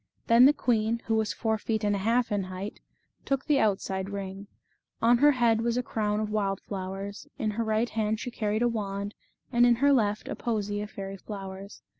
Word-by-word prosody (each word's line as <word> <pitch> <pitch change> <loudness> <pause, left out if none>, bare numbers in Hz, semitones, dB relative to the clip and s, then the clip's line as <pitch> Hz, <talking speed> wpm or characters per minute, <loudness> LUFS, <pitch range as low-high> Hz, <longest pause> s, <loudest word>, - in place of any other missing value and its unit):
Then 235 +2 +7
the - - +7
queen, 230 -5 0
who 225 - 0
was 220 -1 +1
four 220 -2 -1
feet 220 0 -2
and 205 -1 +2
a - - -2
half 230 +4 +1
in 200 -2 0
height, 185 +2 -6 0.4
took 275 -1 -1
the 295 -3 +3
outside 190 -3 0
ring. 200 0 -6 0.5
On 235 +1 +4
her 295 +2 +6
head 235 -3 +3
was 235 +1 0
a 250 - 0
crown 210 -2 -1
of 215 -1 -2
wild 195 -2 0
flowers, 195 +1 -6
in 215 -2 -1
her 230 +2 -2
right 220 +1 +1
hand 220 0 -1
she 245 - -5
carried 215 0 -1
a - - +4
wand, 200 -3 -3 0.4
and 240 -1 +4
in 240 -1 +6
her 280 +4 +4
left 210 -4 +1
a - - -3
posy 205 -3 -2
of 210 - -5
fairy 195 -1 -6
flowers. 195 0 -8
215 Hz, 210 wpm, -28 LUFS, 200-235 Hz, 0.5 s, Then